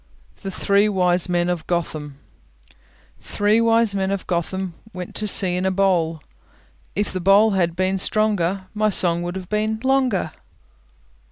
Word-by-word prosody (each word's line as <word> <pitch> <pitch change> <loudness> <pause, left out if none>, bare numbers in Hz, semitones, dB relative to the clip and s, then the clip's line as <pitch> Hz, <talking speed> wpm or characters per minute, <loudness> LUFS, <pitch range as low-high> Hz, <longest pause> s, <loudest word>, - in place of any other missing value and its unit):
THE 195 - -5
THREE 200 +2 +1
WISE 180 -2 +1
MEN 175 0 +1
OF 175 -2 -3
GOTHAM 155 -5 -3 1.0
Three 210 +2 +1
wise 230 -2 +2
men 190 -1 -1
of 195 -1 -3
Gotham 180 +1 -3 0.2
Went 180 -1 -7
to 215 - -2
sea 185 -3 +4
in 180 - -2
a 190 - +1
bowl: 175 -5 0 0.7
If 205 +1 -2
the 185 - -3
bowl 200 +4 +5
had 175 -4 0
been 185 +1 0
stronger, 195 -3 0
My 215 0 +1
song 175 -3 +2
would 175 +1 -5
have 185 -2 -7
been 215 +1 -1
longer. 260 -11 +1
190 Hz, 155 wpm, -21 LUFS, 175-210 Hz, 1.0 s, bowl